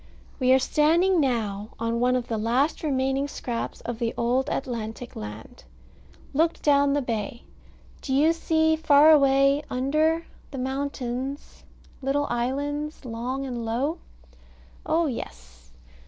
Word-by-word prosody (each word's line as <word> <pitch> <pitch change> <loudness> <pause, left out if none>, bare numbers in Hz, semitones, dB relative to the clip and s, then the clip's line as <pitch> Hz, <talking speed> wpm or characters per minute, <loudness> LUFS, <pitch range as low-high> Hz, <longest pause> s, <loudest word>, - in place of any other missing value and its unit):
We 255 -1 +3
are 260 - +7
standing 330 +7 +3
now 215 -6 -1
on 230 +1 -1
one 250 +1 +2
of 250 -1 -2
the 225 -2 -2
last 250 +8 +1
remaining 270 -1 0
scraps 240 -4 -5
of 240 -2 -5
the 230 -1 -2
old 245 +3 +1
Atlantic 240 -2 -4
land. 105 - -9 0.7
Look 325 +4 +1
down 285 -1 +4
the 285 -1 0
bay. 230 -1 -4 0.6
Do 270 - -5
you 300 +5 +4
see 320 -1 +2
far 310 -1 +6
away, 275 -1 +4
under, 310 +6 +1 0.2
the 275 - -8
mountains, 265 0 -4 0.4
little 280 +2 0
islands, 285 +5 -2
long 250 +3 -4
and 245 -3 -4
low? 265 +9 -1 0.9
Oh, 330 +1 +2
yes. - - -7
265 Hz, 130 wpm, -25 LUFS, 235-290 Hz, 0.9 s, are